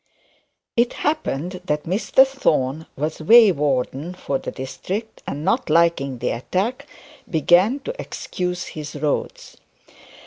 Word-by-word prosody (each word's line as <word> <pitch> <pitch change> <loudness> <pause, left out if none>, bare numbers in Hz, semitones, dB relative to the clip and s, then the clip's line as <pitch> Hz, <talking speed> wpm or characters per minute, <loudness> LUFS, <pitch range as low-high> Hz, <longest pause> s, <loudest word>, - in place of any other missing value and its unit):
It 235 +1 +2
happened 185 - -2
that 150 -2 -1
Mr 210 +8 +4
Thorne 160 - 0
was 155 +3 -3
way 220 +5 +8
warden 145 +2 -1
for 140 -6 -2
the - - -5
district, 190 - -5
and 145 +3 -4
not 230 +8 +1
liking 165 -6 +2
the 120 +1 -1
attack, 215 - -2 0.4
began 180 - +3
to 485 - -4
excuse 180 0 -4
his 150 -1 -7
roads. 145 0 -3
170 Hz, 125 wpm, -22 LUFS, 145-220 Hz, 0.4 s, way